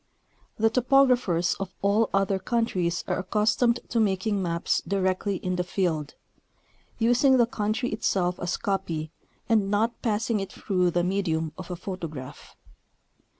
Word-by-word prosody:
The 225 0 +3
topographers 250 -9 +3
of 195 -1 -5
all 205 +3 +3
other 195 0 +1
countries 185 -5 -1
are - - -1
accustomed 220 +5 +2
to 235 - 0
making 200 -1 +1
maps 170 -2 0
directly 190 0 0
in 185 0 -3
the 180 - 0
field, 170 -5 -2 0.8
using 245 +4 +4
the 240 - +5
country 225 +1 -2
itself 180 -2 0
as 175 0 -2
copy, 170 -6 -2 0.4
and 215 -4 +2
not 220 +3 0
passing 220 0 0
it 195 - -5
through 180 -3 0
the 175 0 0
medium 165 -4 -1
of 185 0 -9
a 180 - -3
photograph. 165 -7 -7
195 Hz, 140 wpm, -26 LUFS, 180-225 Hz, 0.8 s, the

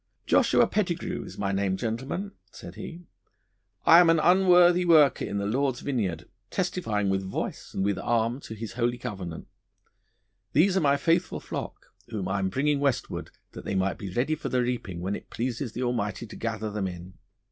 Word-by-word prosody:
'Joshua - - +4
Pettigrue 180 -3 -2
is - - -10
my 100 -1 -1
name, 95 -1 0
gentlemen,' 130 - -3 0.2
said - - -10
he; 170 +1 -8 0.8
'I 165 - +9
am 175 -2 +6
an 165 -1 +5
unworthy 180 +1 +5
worker 155 -6 +5
in 100 - -3
the 100 - -1
Lord's 130 +3 0
vineyard, 95 - -2 0.2
testifying 115 - -1
with 95 0 +1
voice 95 0 -5
and 95 - 0
with 100 -1 0
arm 115 +2 0
to 110 - -9
His 110 +1 -6
holy 120 0 0
covenant. 95 -9 -6 1.1
These 180 +7 +4
are 190 - +3
my 140 -2 +3
faithful 170 +4 +1
flock, - - -7
whom 105 -4 -4
I 95 +1 0
am 95 0 0
bringing 140 +7 +1
westward 140 -3 -1 0.2
that - - -9
they 100 - -3
may 95 +1 +1
be 100 - -7
ready 125 +10 0
for 155 - -4
the 125 -1 +1
reaping 115 -8 -3
when 95 +3 -2
it - - -10
pleases 120 0 -3
the 125 - -3
Almighty 120 -2 -2
to 105 - -11
gather 110 -2 -3
them 100 -2 -2
in. 90 +1 -8
120 Hz, 185 wpm, -27 LUFS, 100-155 Hz, 1.1 s, I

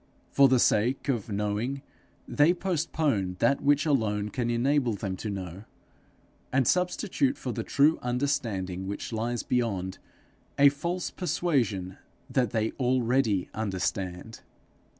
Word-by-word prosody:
For 140 0 +6
the 130 0 +4
sake 120 +4 +2
of 115 -5 -1
knowing, 105 +7 -2 0.4
they 155 +5 +3
postpone 155 - -1
that 140 +8 +2
which 145 +1 +3
alone 105 -8 +1
can 120 +1 -2
enable 125 +1 +1
them 100 -2 -4
to 105 - -5
know, 95 0 -6 0.9
and 130 -2 +2
substitute 180 -5 +1
for 125 - -4
the 115 - -3
true 145 +7 +3
understanding 120 -8 -2
which 100 +3 -5
lies 115 +1 -2
beyond, 100 -7 -1 0.6
a 140 0 +7
false 170 +6 -3
persuasion 120 - -1 0.3
that 125 -4 +2
they 110 +1 0
already 125 -5 +1
understand. 95 0 -3
120 Hz, 125 wpm, -28 LUFS, 100-140 Hz, 0.9 s, a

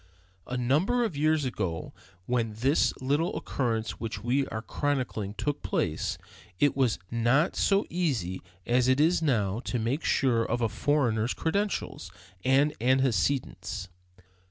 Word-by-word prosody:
A 125 - -3
number 155 - +2
of 215 -9 -2
years 155 0 +2
ago, 95 -10 -3 0.3
when 115 -2 0
this 135 +7 +2
little 145 +6 0
occurrence 115 -4 -2
which 110 -2 -5
we 130 +3 +1
are 110 +1 -5
chronicling 125 -9 -2
took 125 +8 -2
place, - - -1 0.4
it 145 - +3
was 130 -5 +2
not 120 +8 +2
so 200 0 +2
easy 130 - -1 0.2
as 125 +1 +2
it 130 +1 +3
is 165 +3 +3
now 110 -9 +1
to 125 - -1
make 120 +7 -1
sure 120 -5 +2
of 120 +1 -1
a 115 -2 +1
foreigner's 120 -1 +1
credentials 195 - -2 0.3
and 140 +3 +3
antecedents. 125 -7 0
130 Hz, 135 wpm, -28 LUFS, 115-145 Hz, 0.4 s, it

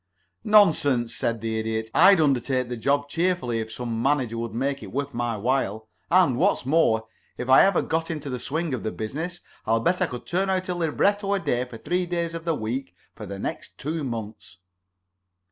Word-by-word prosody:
"Nonsense," 150 - +4
said 115 -2 -1
the 110 -1 -2
Idiot. 110 0 -3
"I'd 190 +2 +7
undertake 130 -3 +1
the 125 - -3
job 140 +5 0
cheerfully 165 -7 0
if 110 0 -5
some 115 -1 -4
manager 130 -4 +1
would 115 -1 -5
make 135 +3 -1
it - - -9
worth 140 +1 -3
my 120 -1 -2
while, 110 -2 -1 0.2
and, 170 -8 +4
what's - - +2
more, 130 -7 +2 0.3
if 125 - -5
I 130 - +8
ever 195 -2 +3
got 160 0 -1
into 150 -3 -4
the 125 -2 -3
swing 160 +5 -2
of 125 - -2
the 110 - -3
business 160 +11 -5 0.3
I'll 115 +1 +3
bet 180 +10 +1
I 185 - +3
could 125 -4 -8
turn 190 +3 0
out 185 -1 -1
a - - +1
libretto 200 +5 +1
a - - 0
day 130 -7 -1
for 125 -2 -10
three 180 +7 -1
days 170 -1 -2
of 165 0 -6
the 165 -2 +1
week 120 -2 -4 0.2
for - - -9
the 100 - -6
next - - -6
two 155 +2 -3
months." 110 - -6
135 Hz, 200 wpm, -25 LUFS, 115-170 Hz, 0.3 s, I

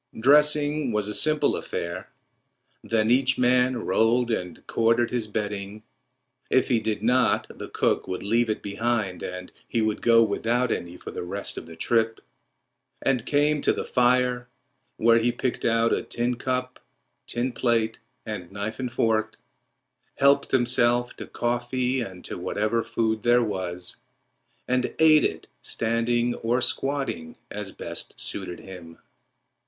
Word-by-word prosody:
Dressing 150 +1 +4
was 105 -2 0
a 105 - -3
simple 155 +9 +2
affair. 85 +2 -5 0.7
Then 110 0 +1
each 130 +1 +4
man 125 0 +3
rolled 115 +5 +2
and 90 -5 -4
corded 115 +1 +2
his 120 -3 -1
bedding—if 105 +4 -4
he 120 -3 +3
did 110 -1 -3
not, 125 +2 +3
the - - -8
cook - - 0
would 95 -1 -4
leave 115 +3 +1
it 110 - -2
behind 105 -2 -1
and 90 0 -6 0.2
he 115 - -1
would 110 -1 0
go 115 -1 +6
without 115 +3 0
any 85 +1 -4
for - - -9
the - - -5
rest 95 +3 -4
of - - -7
the 80 - -10
trip—and 115 +3 -3
came 145 0 +2
to - - +3
the - - -3
fire, 125 0 +2 0.5
where 115 +1 +5
he 120 +1 +2
picked 125 +1 -3
out 115 0 +3
a - - 0
tin 120 +1 -2
cup, 125 +1 -3 0.5
tin 125 +2 -1
plate, 115 -2 0 0.3
and 90 0 -6
knife 100 +4 -5
and 125 -2 -3
fork, 110 -1 0 0.8
helped 140 0 +3
himself 120 -1 +2
to - - -8
coffee 125 +2 -1
and 95 -6 -8
to - - -6
whatever 105 +5 0
food 110 -1 -1
there 120 +1 +4
was, 90 -4 -4 0.7
and 125 0 0
ate 155 -1 +6
it - - -2
standing 120 +1 0
or 120 +2 0
squatting 135 - -1 0.2
as - - -5
best - - -7
suited 95 -3 -4
him. 85 -3 -11
115 Hz, 145 wpm, -25 LUFS, 105-125 Hz, 0.8 s, go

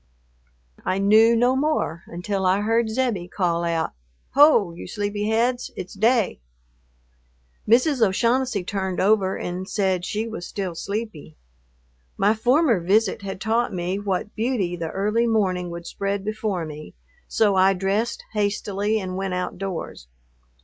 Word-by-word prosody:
I 185 - 0
knew 215 +4 +5
no 245 +3 +3
more 265 - 0
until 190 +3 -3
I 190 +2 +3
heard 225 +1 +1
Zebbie 220 -7 -1
call 175 -2 -1
out, 165 -1 -1 0.4
"Ho, 280 - +5
you 170 - -9
sleepy 205 +1 -2
heads, 245 +3 +1
it's 185 0 -7
day." 225 - +2 1.3
Mrs. 255 +4 +3
O'Shaughnessy 230 +1 +2
turned 190 -1 -3
over 195 -1 +2
and 185 +2 -5
said 190 -3 0
she 215 +5 -2
was 220 -6 -6
still 190 -3 -4
sleepy. 200 - -5 0.8
My 205 +2 +3
former 245 - +3
visit 200 +4 +1
had 195 -1 -6
taught 225 -1 0
me 180 +2 -2
what 205 0 -2
beauty 220 -6 -1
the 165 -2 -4
early 210 +6 0
morning 185 -5 0
would 170 0 -7
spread 200 +1 -3
before 215 -5 -2
me, 155 0 -9 0.3
so 210 -3 +2
I 190 +1 +4
dressed 195 +5 -1
hastily 205 0 0
and 185 -2 -5
went 190 -1 -2
outdoors. 180 - -5
200 Hz, 140 wpm, -23 LUFS, 185-225 Hz, 1.3 s, knew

